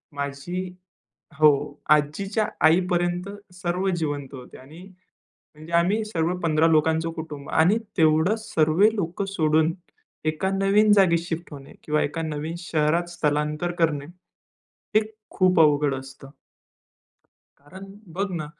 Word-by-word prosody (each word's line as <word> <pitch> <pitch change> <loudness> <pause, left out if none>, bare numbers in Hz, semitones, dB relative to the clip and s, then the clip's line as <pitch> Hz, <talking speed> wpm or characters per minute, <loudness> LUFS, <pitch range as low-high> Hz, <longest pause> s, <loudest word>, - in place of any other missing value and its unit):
माझी 140 +6 -4 0.7
हो, 145 -1 +3
आजीच्या 195 +9 +1 0.2
आई 160 +3 +6
पर्यंत 175 +1 -1 0.2
सर्व 180 +1 -2
जिवंत 145 -5 -4
होते 130 -2 -11
आणि 150 +6 -14 0.5
म्हणजे 155 +2 -15
आम्ही 185 +6 +2
सर्व 175 -4 -1
15 160 0 +3
लोकांचं 160 +1 +2
कुटुंब 155 -3 -8
आणि 175 +7 +3 0.2
तेवढं 160 +4 +3
सर्वे 190 +2 +2
लोकं 190 0 -3
सोडून 160 -3 +1 0.5
एका 155 +5 0
नवीन 195 +2 +3
जागी 190 -4 +4
शिफ्ट 170 0 -6
होणे 140 -1 -11
किंवा 150 0 0
एका 155 +3 -3
नवीन 155 +1 -4
शहरात 170 0 0
स्थलांतर 150 0 -1
करणे, 150 -4 +1
हे 175 +3 -21 0.9
खूप 185 -2 +2
अवघड 145 -2 +3
असतं. 135 0 -10 1.3
कारण 185 +7 -12 0.3
बघ 195 +3 -1
ना, 170 -4 -4
160 Hz, 125 wpm, -24 LUFS, 150-180 Hz, 1.3 s, आई